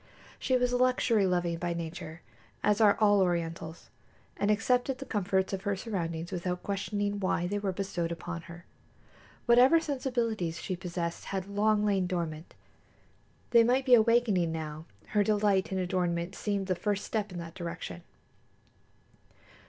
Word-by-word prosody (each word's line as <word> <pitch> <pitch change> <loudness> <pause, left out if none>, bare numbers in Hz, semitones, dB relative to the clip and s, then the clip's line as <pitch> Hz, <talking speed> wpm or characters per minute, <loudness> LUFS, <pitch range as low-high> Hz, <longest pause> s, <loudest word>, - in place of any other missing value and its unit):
She 260 -2 +2
was 250 0 +1
luxury 245 -4 +3
loving 175 -2 0
by 175 0 -2
nature, 165 0 -6 0.4
as 210 +1 +2
are 205 -2 +5
all 205 -2 +5
Orientals, 165 -2 -2 0.4
and 205 - 0
accepted 245 +5 +1
the 275 - -7
comforts 195 -5 0
of 190 - -2
her 200 0 -1
surroundings 170 -5 -4
without 180 0 -3
questioning 205 +1 -2
why 185 -2 0
they 205 +3 -1
were 200 -2 -1
bestowed 185 -3 -3
upon 170 0 -5
her. 170 0 -11 0.8
Whatever 250 +7 +6
sensibilities 235 - -2
she 185 - -3
possessed 175 -1 -4
had 190 -2 -3
long 210 +1 +2
lain 195 -3 +1
dormant. 170 -3 -4 1.0
They 235 -1 +7
might 255 +3 +2
be 255 - +4
awakening 225 -7 +4
now; 155 -1 -5 0.2
her 210 -1 +2
delight 205 -2 +2
in 190 - -1
adornment 180 -1 -1
seemed 200 -1 -2
the 185 - 0
first 205 +2 -2
step 210 -2 -2
in 180 - -7
that 165 -1 -7
direction. 165 - -6
195 Hz, 150 wpm, -30 LUFS, 170-215 Hz, 1.0 s, They